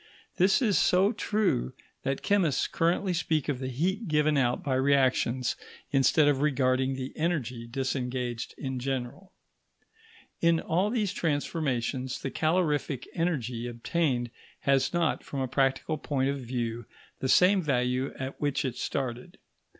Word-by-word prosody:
This 195 +8 +4
is 210 -5 +3
so 190 +3 +4
true, 210 - 0 0.3
that 135 0 -2
chemists 185 -9 +2
currently 175 +3 +1
speak 160 -4 0
of 140 -4 -1
the 130 - -3
heat 185 - -1
given 150 -1 +2
out 125 -3 +1
by 140 - -1
reactions 130 -2 +2 0.4
instead 145 +2 +4
of 140 -2 +2
regarding 130 -2 +2
the 130 0 -5
energy 130 -8 -2
disengaged 125 -1 -3
in 130 -2 -4
general. 135 +8 -4 1.1
In 170 -1 +4
all 180 +7 0
these 210 -4 0
transformations 140 -6 -1
the 135 - -4
calorific 155 -5 0
energy 125 -9 -1
obtained 120 0 -1 0.3
has 135 -1 +2
not, 170 -2 0
from 140 - -5
a 130 - 0
practical 135 +4 0
point 135 -2 0
of 140 - -4
view, 120 -2 -4 0.3
the 130 - -2
same 185 +5 +5
value 130 -3 0
at 130 +1 -6
which 145 -1 0
it 125 -2 -3
started. 125 -3 -4
135 Hz, 140 wpm, -28 LUFS, 130-165 Hz, 1.1 s, same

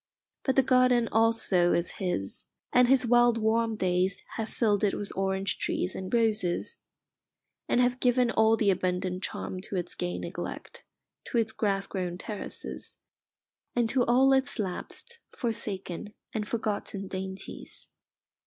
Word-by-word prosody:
But 265 - +1
the 270 - +5
garden 255 -2 +4
also 220 -6 +3
is 170 - +1
his, 175 - -2 0.3
and 250 0 +6
his 260 0 +4
wild 240 0 +5
warm 225 0 +1
days 185 -1 0
have 220 0 -3
filled 210 -3 +1
it 205 - +2
with 205 - -4
orange 190 0 0
trees 185 - -1
and 185 0 -6
roses, 220 -6 0 0.9
and - - +3
have 250 0 +2
given 245 -1 +3
all 220 0 +4
the 205 -3 +3
abundant 185 0 -1
charm 185 -1 -3
to 200 - -7
its 175 -1 -2
gay 175 0 -3
neglect, - - -6 0.4
to 245 - -2
its 225 -1 +2
grass 200 -3 0
grown 180 -3 -3
terraces, 210 +2 -5 0.8
and 240 -2 +2
to 260 -2 +3
all 265 +3 +5
its 270 +1 +1
lapsed, 220 - -4 0.2
forsaken, 205 -4 -3 0.2
and 210 -1 -2
forgotten 210 -3 -2
dainties. 190 0 -6
215 Hz, 145 wpm, -28 LUFS, 190-240 Hz, 0.9 s, and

